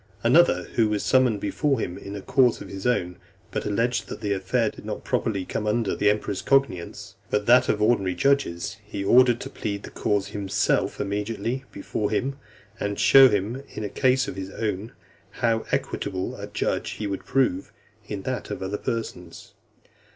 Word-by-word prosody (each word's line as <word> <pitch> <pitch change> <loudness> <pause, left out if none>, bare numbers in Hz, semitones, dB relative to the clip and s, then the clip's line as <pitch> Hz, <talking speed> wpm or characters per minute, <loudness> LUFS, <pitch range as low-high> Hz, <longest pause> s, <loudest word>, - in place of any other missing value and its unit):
Another 90 +1 +5
who 110 -2 +3
was 105 -1 -1
summoned 125 -5 +3
before 135 +7 0
him 90 -4 -3
in 100 +1 -8
a 100 - -7
cause 125 -3 +3
of - - -9
his 95 +3 -4
own, 90 -8 0 0.3
but - - -3
alleged 115 +2 0
that - - -7
the 105 -2 -1
affair 95 -1 0
did - - -13
not - - -5
properly 100 -4 -1
come 105 - -3
under 110 -1 +1
the 105 - 0
(306) - - +7
emperor's 100 -2 -4
cognizance, 105 -6 0
but 105 0 0
that 125 +2 +5
of - - +2
the 105 - +2
ordinary 95 -6 +2
judges, 105 -5 0
he 100 -1 -5
ordered 120 +3 +5
to - - -6
plead 100 -1 -4
the - - -9
cause 100 -1 -1
himself 100 -2 0
immediately 115 +6 -2
before 105 +1 -3
him, 135 +2 -1 0.4
and 100 0 -2
show 135 -1 +8
in 110 +3 -3
a 105 - -3
case 130 +3 +2
of - - -5
his 95 0 -5
own, 105 +2 -3 0.4
how 115 -1 0
equitable 95 0 -2
a - - -7
judge - - -2
he 110 - -5
would 100 -1 -3
prove 115 -8 0 0.4
in 100 -2 -5
that 130 +2 -3
of - - -4
other 100 +2 -3
persons. 90 -7 -5
105 Hz, 185 wpm, -25 LUFS, 100-120 Hz, 0.4 s, show